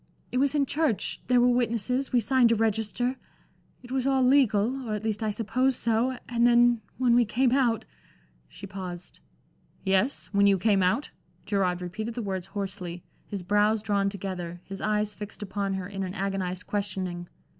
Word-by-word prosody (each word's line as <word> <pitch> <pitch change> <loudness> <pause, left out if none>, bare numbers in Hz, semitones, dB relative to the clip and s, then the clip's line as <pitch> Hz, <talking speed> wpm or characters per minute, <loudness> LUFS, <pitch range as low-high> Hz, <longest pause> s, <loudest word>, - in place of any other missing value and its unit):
It 250 - 0
was 280 +2 +2
in 285 -1 +3
church 280 -5 -1
there 250 -1 +4
were 245 - +5
witnesses, 245 +2 0
we 245 - +4
signed 245 0 +4
a - - +4
register 225 +3 0 0.7
it 245 - -12
was 265 0 0
all 265 -1 +3
legal, 250 -1 +3
or 215 - 0
at 210 - -5
least 220 -1 -2
I 220 - 0
suppose 240 +5 +1
so. 235 +3 +1
And 235 0 +3
then 240 -1 +4 0.2
when 250 -2 +3
we 240 0 +5
came 240 +3 +1
out" 245 -4 +2 0.6
she - - -10
paused. 185 -2 -8 0.6
"Yes 195 +7 +1
when 200 0 +4
you 200 -1 +4
came 200 0 +2
out?" 185 +11 +1 0.3
Gerard 180 -3 0
repeated 215 +6 -5
the 240 - -3
words 190 -2 -3
hoarsely, 190 -3 -5 0.2
his 200 -4 -5
brows 210 +3 +2
drawn 200 -2 +1
together, 180 -3 -5
his 195 0 -8
eyes 210 0 0
fixed 210 0 -8
upon 195 -1 -2
her 190 -1 -4
in 195 -1 -6
an 185 0 -4
agonized 190 -2 -2
questioning. 190 -4 -3
210 Hz, 175 wpm, -27 LUFS, 195-245 Hz, 0.7 s, were